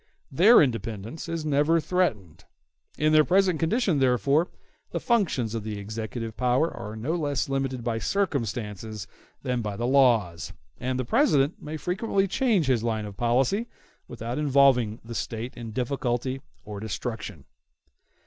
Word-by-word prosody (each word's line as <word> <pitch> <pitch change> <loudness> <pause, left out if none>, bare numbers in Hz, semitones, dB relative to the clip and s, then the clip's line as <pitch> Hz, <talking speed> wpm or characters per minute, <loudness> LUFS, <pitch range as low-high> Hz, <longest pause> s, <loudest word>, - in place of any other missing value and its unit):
Their 190 - +7
independence 115 - -4
is 165 -2 -3
never 150 +3 +3
threatened. 150 - -1 0.5
In 155 +1 +2
their 155 0 +7
present 185 -1 +2
condition, 175 - +1
therefore, 140 +5 +3 0.4
the - - -3
functions 165 - +1
of 115 -2 -3
the 105 -1 -4
executive 110 +2 -5
power 125 +6 +1
are 110 -2 -7
no 120 +9 -2
less 145 -5 -1
limited 135 -2 -2
by 115 -1 -1
circumstances 110 - -2 0.4
than 125 -3 -1
by 105 -2 -4
the 120 - -2
laws; 120 -10 +2 0.3
and 130 +1 -2
the 130 - -2
President 145 - +2
may 155 +1 -5
frequently 195 - 0
change 225 - +2
his 130 -4 +2
line 110 -2 -1
of 100 -1 -8
policy 130 - +1 0.4
without 120 +3 -5
involving 135 -6 +3
the 115 - -7
State 115 +1 -4
in 115 -2 -7
difficulty 130 +1 -2 0.2
or 105 -1 -6
destruction. 110 - -5
130 Hz, 145 wpm, -26 LUFS, 115-155 Hz, 0.5 s, Their